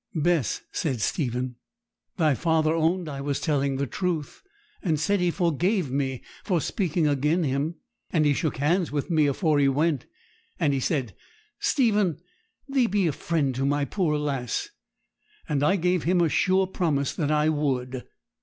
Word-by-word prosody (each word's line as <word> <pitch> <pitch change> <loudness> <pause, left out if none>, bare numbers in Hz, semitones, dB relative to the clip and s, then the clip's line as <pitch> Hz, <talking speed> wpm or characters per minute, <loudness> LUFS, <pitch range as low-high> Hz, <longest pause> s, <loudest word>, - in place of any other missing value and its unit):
'Bess,' 160 -4 +1
said 135 -7 -2
Stephen, 125 - -2 0.6
'thy 155 -5 +3
father 160 +2 +1
owned 165 +2 +1
I 140 -2 -5
was 140 0 -1
telling 140 -3 0
the 140 +1 -1
truth, 165 - -3 0.4
and 160 -5 0
said 200 +6 +1
he 180 0 +2
forgave 175 - 0
me 135 -2 -2 0.2
for 180 -5 +1
speaking 170 -1 0
agen 150 +5 +1
him; 140 +4 -1 0.3
and 155 -3 +2
he 145 - +4
shook 155 +1 -1
hands 165 +6 +1
with 145 +4 -2
me 155 -3 +4
afore 150 +1 +1
he 140 - +4
went; 145 0 +1 0.5
and 145 -4 +2
he 135 - 0
said, 130 -5 -1 0.5
"Stephen, 220 - +2 0.5
thee 270 -3 +2
be 200 -2 +1
a 165 - +2
friend 145 -2 -1
to 130 +2 -2
my 145 +1 +1
poor 160 -3 0
lass!" 135 -6 -2 0.8
and 145 -2 0
I 150 +7 +3
gave 180 -1 +1
him 180 +3 +2
a 170 -2 +3
sure 190 +4 +3
promise 155 -7 -1
that 150 -4 -1
I 150 0 +3
would.' 130 -4 -1
155 Hz, 165 wpm, -26 LUFS, 140-175 Hz, 0.8 s, he